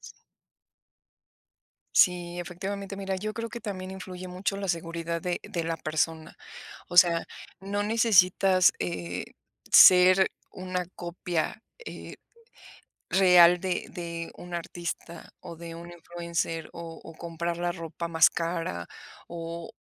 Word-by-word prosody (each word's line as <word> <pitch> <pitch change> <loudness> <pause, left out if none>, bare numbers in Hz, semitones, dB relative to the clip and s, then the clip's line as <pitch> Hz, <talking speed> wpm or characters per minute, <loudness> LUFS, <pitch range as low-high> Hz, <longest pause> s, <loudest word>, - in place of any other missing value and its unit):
Sí. - - -11 1.8
Sí, 175 -1 +3
efectivamente. 195 +3 -5
Mira, 195 -1 -3
yo 215 +3 -4
creo 230 0 -5
que 235 - -7
también 185 -3 -6
influye 185 -1 -8
mucho 185 +2 -3
la 200 -1 -4
seguridad 170 0 -3
de 175 +1 -2
de 180 -6 -4
la 165 0 -2
persona. 155 +1 -2 0.6
O 175 - -3
sea, 170 -2 +6 0.4
no 200 +1 -2
necesitas, 195 -4 +4
eh, 90 0 -3 0.5
ser 185 +1 +8 0.2
una 185 -1 -4
copia, 175 +3 -3 0.2
eh, - - -8 1.0
real 180 -2 +6
de 185 -2 -3
de 170 -1 -6
un 175 0 -9
artista, 170 0 -6
o 170 - -9
de 165 0 -8
un 170 +1 -10
influencer, 170 -1 -4
o 165 -1 -8
o 165 - -10
comprar 170 +1 -4
la 175 0 -1
ropa 170 0 -6
más 160 0 +5
cara, 165 - -3 0.4
o 170 0 -6
175 Hz, 125 wpm, -27 LUFS, 165-185 Hz, 1.8 s, ser